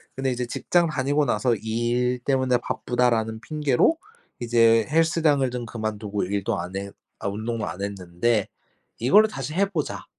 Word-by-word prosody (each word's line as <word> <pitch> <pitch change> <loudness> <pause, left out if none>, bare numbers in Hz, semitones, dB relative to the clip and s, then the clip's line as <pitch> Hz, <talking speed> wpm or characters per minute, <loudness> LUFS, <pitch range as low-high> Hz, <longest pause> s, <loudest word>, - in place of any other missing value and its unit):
근데 135 0 -1
이제 125 0 -2
직장 170 +7 +1
다니고 145 0 0
나서 120 0 +1
"일 120 +3 -1
때문에 130 -1 +1
바쁘다."라는 115 -3 -1
핑계로 150 - +1 0.4
이제 115 -2 +4
헬스장을 155 -4 +2
좀 125 -1 -4
그만두고 110 -3 -3
일도 100 +1 -1
안 90 +2 -6
해 100 0 -4 0.3
아 - - -2
운동도 110 +2 -3
안 100 - -6
했는데 100 +2 -1 0.5
"이거를 205 - +5
다시 155 - -5
해 190 +4 +2
보자." 160 -7 -3
120 Hz, 320 characters per minute, -24 LUFS, 110-140 Hz, 0.5 s, 이거를